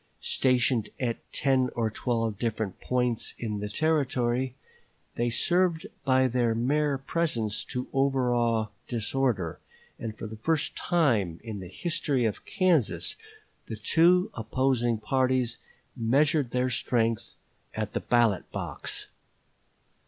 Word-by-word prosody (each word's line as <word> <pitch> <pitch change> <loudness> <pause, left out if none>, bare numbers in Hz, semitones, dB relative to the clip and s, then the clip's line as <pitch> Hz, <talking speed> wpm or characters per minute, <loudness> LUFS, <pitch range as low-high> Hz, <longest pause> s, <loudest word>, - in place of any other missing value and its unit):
Stationed 125 -3 +2
at 120 -3 -1
ten 130 -2 +2
or 115 -2 0
twelve 115 -3 -1
different 110 -4 -2
points 125 -2 0
in 105 -3 -3
the 105 0 -4
Territory, 130 -3 +1 0.6
they 120 +1 0
served 175 +6 +2 0.2
by 130 -1 +4
their 120 -2 +1
mere 140 +4 +1
presence 135 -7 -1
to 125 0 -4
overawe 120 -5 +2 0.2
disorder, 115 - -1 0.4
and 110 -1 -5
for - - -6
the 110 0 -7
first 155 +7 0
time 110 - +1
in 110 -3 -6
the 95 - -7
history 150 - -1
of 110 - -2
Kansas 140 - +2 0.5
the 110 - -4
two 170 - +3
opposing 120 0 +1
parties 125 +1 0 0.4
measured 140 +4 +2
their 125 +1 0
strength 115 -2 0 0.4
at 110 -1 -3
the - - 0
ballot 115 -5 +2
box. - - -2
120 Hz, 120 wpm, -28 LUFS, 110-135 Hz, 0.6 s, by